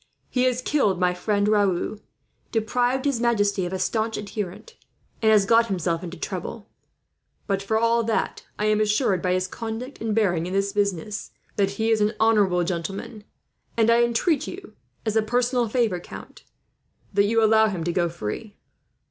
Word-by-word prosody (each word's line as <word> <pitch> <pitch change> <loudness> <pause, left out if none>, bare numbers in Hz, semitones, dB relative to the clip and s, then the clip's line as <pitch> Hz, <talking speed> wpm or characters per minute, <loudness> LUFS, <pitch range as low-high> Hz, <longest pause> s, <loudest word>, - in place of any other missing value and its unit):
He 250 0 +2
has 250 0 0
killed 210 - +1
my 180 -1 +2
friend 205 +3 0
Raoul, 205 -1 +1 0.5
deprived 245 +4 0
his 275 -5 0
majesty 205 -5 +1
of - - -7
a 190 - -2
staunch 220 +4 -1
adherent, 210 - -6 0.5
and 220 -1 +4
has 210 -2 +5
got 230 +3 +4
himself 175 -3 -1
into 175 0 -7
trouble. 195 +5 -5 0.8
But 195 -1 -1
for 220 +3 0
all 230 +1 +3
that, 225 - -1 0.2
I 210 - -1
am 215 0 +3
assured, 210 -3 +2
by 180 -1 +1
his 185 0 0
conduct 230 +6 -6
and 220 -2 -1
bearing 175 -6 +1
in 185 - -5
this 195 0 0
business, 200 -1 -2 0.3
that 200 -2 +2
he 225 +1 +1
is 220 -1 +2
an 210 +1 +2
honourable 205 -5 +3
gentleman; 195 +5 -5 0.5
and 225 0 +4
I 235 +1 +5
intreat 240 +6 +1
you, 380 +1 -9 0.3
as 220 -1 -1
a 220 - +4
personal 245 +1 +1
favour, 220 -6 +1
count, - - -11 0.7
that 200 +1 +4
you 225 +2 +2
allow 220 0 +5
him 185 -6 -3
to 175 +1 -1
go 175 -1 +1
free." 170 - -6
210 Hz, 175 wpm, -24 LUFS, 190-230 Hz, 0.8 s, has